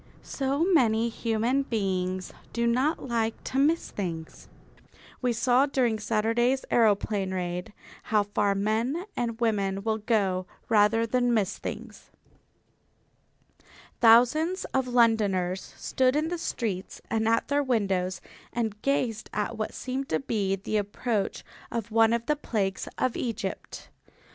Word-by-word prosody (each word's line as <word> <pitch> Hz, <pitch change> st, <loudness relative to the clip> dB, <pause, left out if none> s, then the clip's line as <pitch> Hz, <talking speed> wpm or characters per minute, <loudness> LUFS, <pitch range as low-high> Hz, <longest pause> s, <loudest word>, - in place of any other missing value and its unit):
So 275 Hz, +3 st, -1 dB
many 235 Hz, -, +3 dB
human 230 Hz, +3 st, 0 dB
beings 185 Hz, -6 st, -2 dB, 0.2 s
do 235 Hz, 0 st, 0 dB
not 260 Hz, +6 st, +1 dB
like 225 Hz, -2 st, -1 dB
to 265 Hz, -, -2 dB
miss 315 Hz, +4 st, +2 dB
things. 165 Hz, -5 st, -5 dB, 0.7 s
We 250 Hz, -1 st, +1 dB
saw 245 Hz, +4 st, +3 dB
during 245 Hz, -6 st, +1 dB
Saturday's 230 Hz, +4 st, +1 dB
aeroplane 205 Hz, -3 st, +2 dB
raid 180 Hz, 0 st, -3 dB, 0.3 s
how 215 Hz, -1 st, +2 dB
far 205 Hz, 0 st, 0 dB
men 225 Hz, -, 0 dB
and 230 Hz, -1 st, -2 dB
women 200 Hz, -4 st, 0 dB
will 220 Hz, 0 st, 0 dB
go 195 Hz, -5 st, 0 dB, 0.2 s
rather 225 Hz, +1 st, +4 dB
than 245 Hz, +1 st, +1 dB
miss 200 Hz, -4 st, 0 dB
things. -, -, -7 dB, 1.9 s
Thousands 250 Hz, +11 st, +5 dB
of 265 Hz, -1 st, +1 dB
Londoners 205 Hz, -7 st, +2 dB, 0.2 s
stood 255 Hz, 0 st, +1 dB
in 310 Hz, +2 st, +1 dB
the 350 Hz, 0 st, -3 dB
streets 205 Hz, -, -3 dB
and 225 Hz, 0 st, +1 dB
at 230 Hz, 0 st, +2 dB
their 285 Hz, 0 st, +2 dB
windows 195 Hz, -8 st, 0 dB, 0.3 s
and 220 Hz, -3 st, -3 dB
gazed 245 Hz, -6 st, -1 dB
at 210 Hz, +2 st, -2 dB
what 215 Hz, -1 st, -3 dB
seemed 265 Hz, +1 st, -4 dB
to -, -, +1 dB
be 205 Hz, -7 st, -1 dB
the 200 Hz, +3 st, -2 dB
approach 205 Hz, +1 st, -2 dB, 0.3 s
of 230 Hz, -1 st, -4 dB
one 225 Hz, 0 st, +5 dB
of 235 Hz, 0 st, 0 dB
the 300 Hz, -, +1 dB
plagues 200 Hz, -9 st, -2 dB
of 255 Hz, -, 0 dB
Egypt. 225 Hz, -5 st, -5 dB
225 Hz, 135 wpm, -27 LUFS, 205-250 Hz, 1.9 s, Thousands